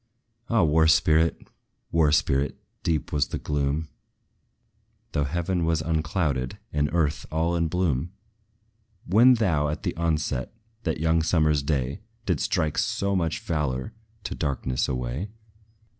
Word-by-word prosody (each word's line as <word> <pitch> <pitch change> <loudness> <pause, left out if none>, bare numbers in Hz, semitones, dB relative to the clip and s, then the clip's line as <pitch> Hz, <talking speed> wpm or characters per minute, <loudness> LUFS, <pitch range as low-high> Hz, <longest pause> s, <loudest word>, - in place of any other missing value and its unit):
Ah, 115 -5 +3
War 80 0 +4
spirit! 80 +1 +3 0.4
War 80 -3 +4
spirit, 70 -1 +1 0.2
deep 80 -4 -1
was 70 -2 +2
the - - -4
gloom, 75 +1 -1 1.2
Though 75 -3 0
heaven 85 +4 -1
was 80 -1 +1
unclouded, 75 -5 -1 0.2
and 75 0 +1
earth 80 -4 0
all 80 +2 +1
in 85 -1 +1
bloom, 85 -3 0 0.9
When 120 +7 +6
thou, 80 -10 +1
at 75 - -4
the - - -2
onset, 75 - -1 0.3
that 80 -2 -1
young 80 +1 +2
summer's 75 -3 +2
day, 70 0 -1 0.2
Didst 90 -8 0
strike 75 -1 0
so 105 -3 0
much 85 -3 0
valor 75 - -2 0.3
to - - -4
darkness 65 -3 -1
away! 65 +8 -3
80 Hz, 130 wpm, -26 LUFS, 75-85 Hz, 1.2 s, When